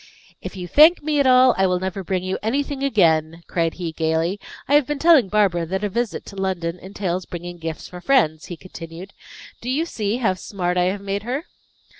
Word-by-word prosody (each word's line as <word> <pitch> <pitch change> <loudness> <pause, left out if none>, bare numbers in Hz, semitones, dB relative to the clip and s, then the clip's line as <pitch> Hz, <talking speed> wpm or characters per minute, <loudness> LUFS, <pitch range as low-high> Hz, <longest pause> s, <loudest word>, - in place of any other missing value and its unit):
"If - - -7
you 180 -2 -6
thank 310 - +6
me 300 -1 0
at 280 - +3
all, 255 0 +6
I 190 - +4
will 180 -1 0
never 190 +1 -4
bring 185 0 -2
you 185 0 -3
anything 275 +5 -2
again," 165 - +2
cried 165 -2 -1
he, 175 -3 -4
gaily. 160 +4 -1 0.3
"I 280 - 0
have 290 -3 +5
been 295 - -2
telling 310 - +5
Barbara 185 -5 +1
that 190 +4 -3
a 205 - 0
visit 235 +1 -3
to 200 - -11
London 180 -3 -2
entails 185 -1 -4
bringing 175 0 -7
gifts 160 -1 -6
for 180 -1 -10
friends," 175 - +2
he 175 - -7
continued. 170 +1 -10 0.5
"Do 245 - -5
you 295 +6 0
see 215 -8 -2
how 220 -7 +1
smart 180 -1 -3
I 180 0 +2
have 195 +2 -1
made 200 0 -3
her?" 255 - -4
190 Hz, 210 wpm, -22 LUFS, 175-245 Hz, 0.5 s, thank